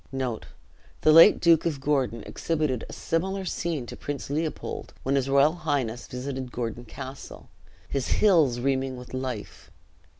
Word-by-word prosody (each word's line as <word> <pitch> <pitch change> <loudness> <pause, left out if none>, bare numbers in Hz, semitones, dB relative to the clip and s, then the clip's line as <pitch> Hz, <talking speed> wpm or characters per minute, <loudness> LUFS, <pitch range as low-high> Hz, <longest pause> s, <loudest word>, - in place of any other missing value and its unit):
The 130 -4 -3 0.6
late 165 +6 +8
Duke 170 -1 +4
of 150 -4 -2
Gordon 135 -6 0
exhibited 150 -7 -2
a - - -8
similar 190 +4 -2
scene 165 -7 -2
to - - -8
Prince 145 -1 -5
Leopold, 155 +2 -4
when 135 - 0
his 135 -1 +1
royal 140 +3 +5
highness 140 -8 -2
visited 130 0 -5
Gordon 120 0 -4
Castle, 130 +3 -9 0.4
his 140 -2 -2
"hills 160 - +4
reeming 130 0 -1
with 125 +1 -11
life." 130 -4 -5
135 Hz, 140 wpm, -26 LUFS, 125-155 Hz, 0.6 s, late